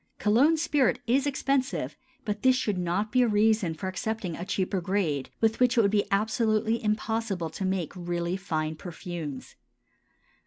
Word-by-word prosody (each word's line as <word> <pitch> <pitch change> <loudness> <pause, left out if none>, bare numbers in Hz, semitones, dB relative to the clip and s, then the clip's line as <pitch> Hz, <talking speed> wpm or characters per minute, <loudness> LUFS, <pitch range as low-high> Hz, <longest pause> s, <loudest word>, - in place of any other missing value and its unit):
Cologne 260 +10 +4
spirit 295 -5 +2
is 270 +4 +2
expensive, 275 -1 -1 0.3
but 210 -1 -3
this 260 -1 +5
should 210 -7 -1
not 180 +5 -1
be 255 - +4
a 245 - +4
reason 210 -5 +2
for 190 - -5
accepting 185 -1 -3
a 175 - -5
cheaper 190 0 -1
grade, 170 -7 -1
with 225 0 +2
which 250 0 +3
it - - +7
would 200 - +2
be 205 -1 +2
absolutely 220 +2 +1
impossible 215 -5 -1
to 195 - -5
make 185 -4 -1
really 175 0 -2
fine 160 -5 -2
perfumes. 165 -4 -7
205 Hz, 160 wpm, -27 LUFS, 175-225 Hz, 0.3 s, it